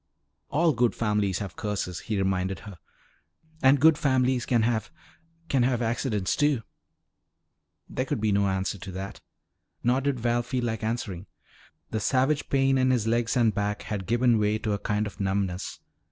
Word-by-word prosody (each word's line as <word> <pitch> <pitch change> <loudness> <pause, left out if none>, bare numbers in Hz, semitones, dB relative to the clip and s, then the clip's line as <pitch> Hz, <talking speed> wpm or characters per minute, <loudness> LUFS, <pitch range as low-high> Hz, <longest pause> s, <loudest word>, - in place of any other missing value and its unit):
"All 165 +1 +3
good 120 -1 +2
families 105 -4 0
have 100 -3 -6
curses," 95 -5 -3
he 110 +4 -3
reminded 95 0 -1
her. 100 -5 -11 0.8
"And 135 +1 +5
good 155 +2 +5
families 130 -3 +2
can 120 -3 +3
have 115 -1 0 0.6
can 135 -5 +2
have 125 -1 +2
accidents, 115 -4 0
too." 145 -6 +2 1.2
There 130 - -2
could 130 - -2
be 110 0 +1
no 100 0 +2
answer 95 0 -1
to 95 +2 -7
that. 95 +2 -6 0.6
Nor 125 +3 +2
did 140 -2 -1
Val 120 +1 +1
feel 125 +1 -3
like 110 -2 -2
answering. 110 -5 -3 0.6
The 110 - -1
savage 130 +6 +1
pain 135 -1 +3
in 130 0 +3
his 125 -4 +2
legs 115 +1 +1
and 115 -3 +3
back 105 0 -2
had 100 -3 -4
given 120 -1 +3
way 105 0 +2
to 110 -1 -2
a 100 - -1
kind 105 +1 -1
of 105 - -8
numbness. 95 -1 -2
115 Hz, 170 wpm, -27 LUFS, 100-125 Hz, 1.2 s, And